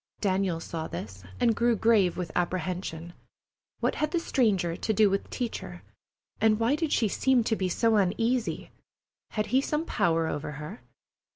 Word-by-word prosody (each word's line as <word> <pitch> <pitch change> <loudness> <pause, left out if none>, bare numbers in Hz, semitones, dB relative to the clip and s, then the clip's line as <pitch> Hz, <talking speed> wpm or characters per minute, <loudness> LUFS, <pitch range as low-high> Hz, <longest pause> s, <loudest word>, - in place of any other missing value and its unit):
Daniel 190 -4 0
saw 165 -1 -5
this, 95 -3 -7 0.2
and 230 -2 +3
grew 235 +1 +2
grave 210 -5 +3
with 175 -3 -4
apprehension. 175 -1 -2 0.7
What - - +1
had 305 - -1
the 345 - 0
stranger 200 - +1
to 220 - -1
do 210 -1 +4
with 195 - 0
the - - -21
teacher, 185 -8 -5 0.6
and 220 -1 +3
why 235 +5 +2
did 310 -1 -2
she 225 - +3
seem 255 +4 +2
to 220 - +1
be 190 -3 -1
so 225 +4 +2
uneasy? 225 +5 0 0.6
Had 215 -1 -1
he 265 - +5
some 300 +3 -1
power 165 - +1
over 150 -1 -3
her? 150 - -8
200 Hz, 170 wpm, -28 LUFS, 175-230 Hz, 0.7 s, he